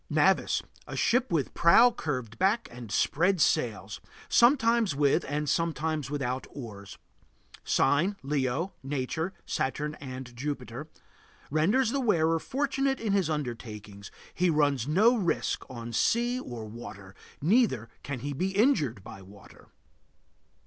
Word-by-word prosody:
NAVIS. - - +2 0.2
A - - -6
ship 245 -2 +2
with 155 -6 0
prow 230 +9 +6
curved 130 - -4
back 200 +5 +2
and 120 -3 -9
spread 180 - +2
sails; 105 -11 0 0.3
sometimes 235 - +4
with 145 +3 +2
and 150 +2 -2
sometimes 160 -3 -1
without 130 -3 -3
oars. 105 -6 -9 0.7
Sign: 165 +9 +2
Leo. 140 +5 -1
Nature: 145 +6 -2
Saturn 150 +3 -2
and 130 -2 -8
Jupiter. 135 0 -5 0.6
Renders 205 - +2
the 280 - 0
wearer 165 -9 +2
fortunate 270 - -1
in 215 -3 -1
his 190 -5 +2
undertakings; 110 -8 -5 0.2
he 180 0 +2
runs 145 -5 +2
no 210 +11 +4
risk 185 -8 -1
on 120 -2 -7
sea 240 - +1
or 120 - -7
water, 100 -3 -10 0.3
neither 165 - +2
can 135 -4 -5
he 145 +2 -3
be 190 +7 -2
injured 155 - +2
by 95 - -10
water. 100 +1 -16
150 Hz, 130 wpm, -28 LUFS, 125-195 Hz, 0.7 s, prow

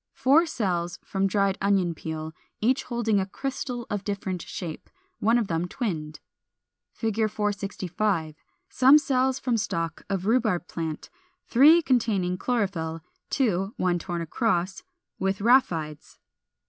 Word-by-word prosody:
464. - - -27
Four 290 +6 +6
cells 180 - -2
from 195 0 0
dried 195 0 +1
Onion 195 -3 +2
peel, 160 0 -6 0.3
each 255 +5 +1
holding 230 -4 +1
a 190 - -1
crystal 250 +1 -4
of 205 -1 -2
different 195 -3 -3
shape, 165 -1 -7 0.3
one 225 +3 +3
of 230 -4 0
them 165 0 -1
twinned. 160 - -4 0.7
465. 205 -5 -1 0.3
Some 265 +3 +6
cells 265 -3 +1
from 245 -3 0
stalk 165 -7 -2
of 195 -2 -2
Rhubarb 220 -6 +1
plant, 160 -2 -5 0.3
three 305 +7 +6
containing 210 -9 +1
chlorophyll; 185 -10 -1 0.3
two 200 -6 0
(one 175 -1 +1
torn 175 -1 -4
across) 185 0 -1 0.4
with 195 0 0
rhaphides. 175 - +1
200 Hz, 125 wpm, -26 LUFS, 175-235 Hz, 0.7 s, Four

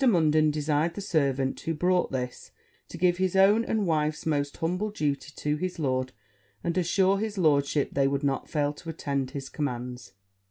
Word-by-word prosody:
Munden 155 - +4
desired 150 +2 0
the - - -5
servant 140 -8 0
who 165 - -3
brought 180 +3 +1
this, 125 -2 -4 0.4
to - - -9
give 175 0 +2
his 185 0 0
own 200 +4 +5
and 220 -3 0
wife's 155 -2 0
most 145 -2 -1
humble 180 +6 -1
duty 145 -7 -2
to 150 0 -1
his 185 +3 -3
lord, 130 -4 -1 0.5
and 170 -1 -1
assure 190 +2 +2
his 215 -1 -3
lordship 145 -4 +2
they 135 -1 +3
would 140 +1 -1
not 140 -1 -1
fail 145 -2 0
to 165 +3 -10
attend 140 -4 -2
his 140 -2 -6
commands. 125 -6 -5
155 Hz, 175 wpm, -27 LUFS, 140-180 Hz, 0.5 s, own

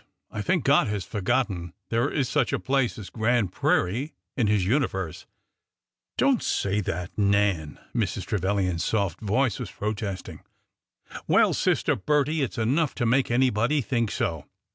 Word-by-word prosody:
I 105 - -4
think 175 - +1
God 140 -2 +4
has 105 -3 -2
forgotten 100 -5 -1 0.2
there 115 +4 +1
is 140 -4 0
such 135 0 +1
a - - 0
place 135 -2 0
as 105 -4 -8
Grand 115 -3 +1
Prairie 120 - 0 0.2
in 120 -6 +1
His 100 -3 +2
universe! 95 - -1 0.3
" - - -62
" - - -64
Don't 270 -2 +3
say 100 +1 0
that. 90 -1 -4
Nan," 100 -6 +1 0.2
Mrs. - - -1
Trevilian's 95 -3 0
soft 100 -6 -1
voice 115 +2 +1
was - - -5
protesting. 105 -3 -4 0.5
'' - - -14
Well, - - +4
Sister - - +1
Bettie, 150 +6 +1
it 135 - -1
's - - -12
enough 135 +7 +1
to 120 - -1
make 125 +3 +2
anybody 125 +3 +2
think 115 -3 0
so! 80 -7 -2
110 Hz, 165 wpm, -26 LUFS, 95-130 Hz, 0.5 s, God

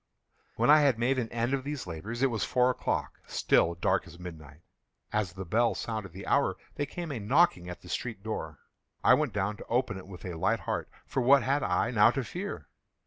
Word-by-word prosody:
When - - +4
I 155 - +8
had 140 -5 +3
made 130 +3 +1
an 115 -2 -3
end 120 +3 -1
of 135 -1 0
these 145 -1 -4
labors, 105 +9 -5
it 135 - +3
was 110 -3 -1
four 125 0 +3
o'clock—still 85 -7 0
dark 85 - +1
as - - -12
midnight. 80 -4 -10 0.5
As 105 -4 0
the 95 0 -6
bell 115 +6 +2
sounded 110 -5 -4
the 95 +4 -9
hour, 140 - +2 0.2
there 145 - -2
came 170 +1 -5
a 130 - -3
knocking 105 - +3
at 90 - -8
the - - -12
street 110 +1 -4
door. 80 -9 -4 0.5
I - - +7
went 150 -5 +2
down 105 +1 -1
to - - -10
open 115 -5 0
it 95 - -12
with 95 -3 -10
a 90 - -4
light 80 - 0
heart,—for 130 - -4
what 135 +1 +6
had 140 +4 +1
I 100 +2 +1
now 110 -1 +6
to 135 +2 -1
fear? 185 - -6
115 Hz, 210 wpm, -29 LUFS, 95-135 Hz, 0.5 s, I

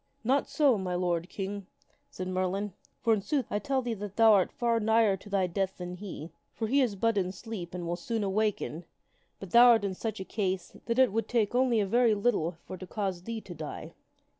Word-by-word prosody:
" - - -43
Not 270 +5 +1
so, 275 -8 +3
my 180 -1 -2
lord 175 -1 -1
King! 200 -1 -5 0.2
" - - -40
said 185 - -6
Merlin; 185 +2 -1
" - - -45
for, 230 -2 +4
in 210 - +1
sooth, 275 +3 -1
I 205 - 0
tell 270 +1 -1
thee 240 -1 -2
that 205 -2 -7
thou 225 -1 +7
art 195 -3 +3
far 235 -1 +1
nigher 220 -2 +3
to 205 - -13
thy 195 -2 +2
death 190 +2 -2
than 180 0 -6
he. 180 -4 -8 0.2
For 225 - -2
he 275 +5 +3
is 235 -6 +1
but 225 +1 +1
in 185 -1 -1
sleep 185 -3 -7
and 175 -1 -4
will 170 +1 -1
soon 220 +5 -3
awaken; 195 -4 -1 0.5
but 195 -3 -9
thou 240 +1 +8
art 225 -4 +5
in 195 - -1
such 220 +2 -4
a 190 - -5
case 190 -4 -2
that 230 0 0
it 260 -5 +4
would 225 +1 0
take 230 -2 +1
only 250 -2 +3
a 205 - +2
very 230 +2 +3
little 190 -6 0
for 185 - -7
to 185 - -9
cause 190 -3 -3
thee 230 -1 -4
to 180 - -9
die." 155 -2 -7
205 Hz, 240 wpm, -29 LUFS, 185-230 Hz, 0.5 s, thou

